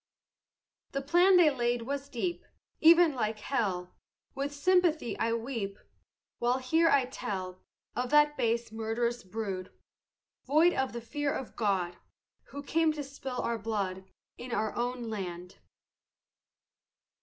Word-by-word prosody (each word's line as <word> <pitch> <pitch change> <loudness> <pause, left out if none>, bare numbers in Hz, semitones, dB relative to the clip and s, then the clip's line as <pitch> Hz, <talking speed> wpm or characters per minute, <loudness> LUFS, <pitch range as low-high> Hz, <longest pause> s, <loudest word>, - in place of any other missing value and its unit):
The 275 0 -2
plan 355 +6 +5
they 330 -4 +6
laid 240 -2 0
was 280 +2 -4
deep 345 +8 -3 0.4
Even 335 -1 +7
like 220 -4 -1
hell; 195 -7 -2 0.4
With 280 +1 -3
sympathy 325 -3 +2
I 230 0 +1
weep, 230 -4 -3 0.6
While 245 +1 +2
here 320 +6 +3
I 275 -4 +4
tell 185 -6 -5 0.3
Of 250 0 -1
that 295 +1 +5
base 235 -3 0
murderous 225 +2 -1
brood, 190 -2 -5 0.8
Void 315 +6 +5
of 265 -2 -1
the 235 - -5
fear 290 +4 -2
of 265 - -5
God, 190 -5 0 0.5
Who 285 0 -8
came 320 +2 +2
to 300 -1 -4
spill 270 -2 -5
our 235 -1 -1
blood 195 -4 -3 0.3
In 245 0 -7
our 220 -2 -1
own 245 +1 -2
land. 180 -3 -6
245 Hz, 130 wpm, -30 LUFS, 220-285 Hz, 0.8 s, Even